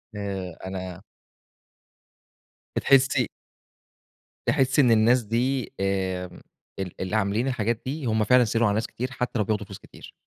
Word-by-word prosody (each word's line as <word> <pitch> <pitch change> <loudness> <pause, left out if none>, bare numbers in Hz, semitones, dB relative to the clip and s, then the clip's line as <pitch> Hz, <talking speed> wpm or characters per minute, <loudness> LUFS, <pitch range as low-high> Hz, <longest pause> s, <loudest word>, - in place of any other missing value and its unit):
آآ 95 -4 -4
أنا 95 -1 -6 1.7
بتحسي 135 -1 +4 1.2
تحسي 135 +2 +3
إن 125 -4 +4
الناس 115 +2 +4
دي، 125 +4 -1
آمم، 95 -2 -2 0.4
ال 95 -2 -5
اللي 95 +3 -2
عاملين 110 +4 +1
الحاجات 115 -2 -1
دي، 140 +2 -4
هم 110 -2 +2
فعلًا 125 +3 +5
سهِلوا 115 +2 +2
على 100 - +2
ناس 110 +1 -1
كتير، 130 +2 -5
حتى 125 -2 -2
لو 105 - +1
بياخدوا 105 0 -1
فلوس 100 -1 -9
كتير. - - -14
110 Hz, 140 wpm, -25 LUFS, 95-125 Hz, 1.7 s, فعلًا